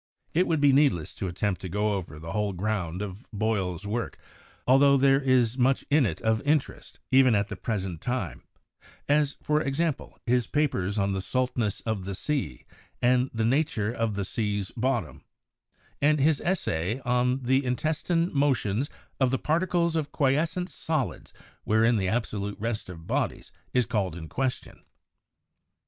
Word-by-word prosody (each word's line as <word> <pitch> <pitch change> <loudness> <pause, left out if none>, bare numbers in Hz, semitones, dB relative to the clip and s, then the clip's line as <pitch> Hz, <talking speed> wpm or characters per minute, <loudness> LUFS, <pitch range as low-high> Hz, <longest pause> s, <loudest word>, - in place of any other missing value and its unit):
It 180 +3 +3
would 160 -2 +1
be 145 -1 +5
needless 135 - +3
to 95 - -4
attempt 95 +2 -2
to 95 - -5
go 105 +4 0
over 85 -7 -5
the 80 +2 -7
whole 105 0 -1
ground 95 -2 -2
of 100 +3 -8
Boyle's 100 -4 -1
work, 115 +3 -3 0.5
altho 140 +2 +6
there 135 +1 +4
is 130 -2 +2
much 130 +2 +2
in 145 -4 +5
it 80 - -4
of 110 -1 +1
interest 150 -1 -1
even 130 -3 +6
at 100 +1 0
the 105 - -4
present 95 -7 -3
time, 120 - -3 0.7
as, 145 0 +2
for 150 0 +2
example, 150 +2 -2
his 125 -1 +2
papers 110 -10 0
on 100 -1 +1
the 95 - -2
'Saltness 125 -2 -1
of 110 -5 -3
the 100 0 -4
Sea,' 135 - -3 0.3
and 125 +1 +3
the 110 -1 -1
'Nature 115 -4 +1
of 115 -3 -1
the 100 -1 -2
Sea's 105 -2 -2
Bottom,' 125 0 -2 0.8
and 150 +1 +4
his 150 +1 +3
'Essay 110 - -1
of 125 +2 +1
the 130 +3 +2
Intestine 160 +6 0
Motions 135 -4 +1 0.3
of 130 -2 +3
the 130 - +1
Particles 170 +2 +1
of 155 -2 -1
Quiescent 160 +6 0
Solids 155 -6 -3 0.3
wherein 110 +2 +3
the 95 -2 0
absolute 105 -2 -2
Rest 110 -3 -3
of 85 -2 -9
Bodies - - -2 0.2
is 125 -2 +2
called 100 -8 -1
in 80 -2 -7
question.' 130 - -3
120 Hz, 160 wpm, -27 LUFS, 100-140 Hz, 0.8 s, altho